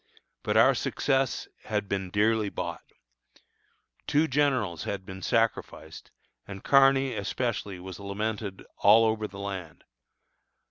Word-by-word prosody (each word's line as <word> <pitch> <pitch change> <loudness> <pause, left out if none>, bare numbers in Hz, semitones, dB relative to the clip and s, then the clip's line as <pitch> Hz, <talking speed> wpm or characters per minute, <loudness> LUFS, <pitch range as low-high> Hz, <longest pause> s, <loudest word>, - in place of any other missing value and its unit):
But - - 0
our - - +6
success 135 -1 -1 0.2
had 105 -2 -2
been 95 -2 -3
dearly 105 +2 +1
bought. - - -5 1.3
Two 155 +2 +2
generals 130 - 0
had 95 -2 -4
been 95 -1 -9
sacrificed, 115 +3 -2 0.4
and 100 -1 -9
Kearny 135 -1 +4
especially 100 -2 -3
was 95 +1 -9
lamented 100 0 -4
all 110 +3 +6
over 110 -1 0
the 100 - -12
land. 95 -6 -6
105 Hz, 120 wpm, -27 LUFS, 100-120 Hz, 1.3 s, our